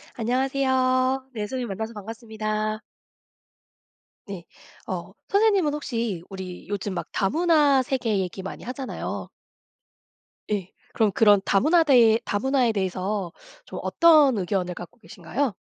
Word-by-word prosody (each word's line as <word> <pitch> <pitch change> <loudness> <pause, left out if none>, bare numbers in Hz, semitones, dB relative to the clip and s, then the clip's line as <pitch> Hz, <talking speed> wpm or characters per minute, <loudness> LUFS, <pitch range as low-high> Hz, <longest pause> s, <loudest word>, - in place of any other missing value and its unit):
안녕하세요. 260 +1 +1
네. 215 - -5
선생님, 255 -1 -4
만나서 220 +3 -5
반갑습니다. 215 0 -4 1.5
네. 190 -4 -7 0.4
어 - - -5 0.2
선생님은 400 -7 +3
혹시 230 - -3
우리 185 -3 -8
요즘 205 0 -3
막 175 - -4
다문화 295 - +3
세계 240 -5 -1
얘기 185 0 -4
많이 190 - -7
하잖아요. 260 +2 -5 1.2
예. 195 -3 -2 0.2
그러면 220 -3 +2
그런 205 -2 +5
다문화 315 - +4
대해 235 -7 +5
다문화에 250 +3 +1
대해서 190 -1 -2 0.3
좀 - - -7
어떤 305 -7 +5
의견을 180 -1 -1
갖고 175 +4 -11
계신가요? 225 - -3
225 Hz, 280 characters per minute, -24 LUFS, 200-265 Hz, 1.5 s, 그런